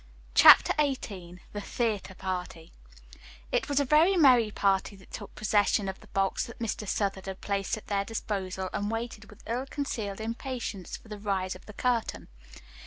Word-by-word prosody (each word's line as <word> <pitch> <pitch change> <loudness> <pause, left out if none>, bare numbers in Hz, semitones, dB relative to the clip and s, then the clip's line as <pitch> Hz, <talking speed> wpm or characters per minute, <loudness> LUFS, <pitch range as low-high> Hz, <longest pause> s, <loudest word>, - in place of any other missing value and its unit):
CHAPTER - - +9
XVIII 195 -11 -2
THE 205 - -4
THEATRE 210 -4 -2
PARTY 180 -3 -5 0.8
It - - 0
was 285 -1 +2
a 285 - +2
very 320 +8 +5
merry 250 -8 +6
party 200 -1 +1
that 190 -1 -18
took - - -8
possession 205 -1 +2
of 190 0 -5
the - - -17
box 195 -1 0
that 235 - -11
Mr. 220 -2 -3
Southard 195 -1 -1
had 190 0 -5
placed 200 +1 -1
at 220 - -11
their 200 -1 0
disposal 190 -3 -3
and 205 +1 -1
waited 225 -1 -5
with 210 - -16
ill 245 +4 -2
concealed 225 -9 -4
impatience 230 -4 -4
for - - -19
the 210 -1 -7
rise 195 -2 -1
of - - -14
the 210 - -9
curtain. 230 - -1
205 Hz, 175 wpm, -29 LUFS, 195-235 Hz, 0.8 s, CHAPTER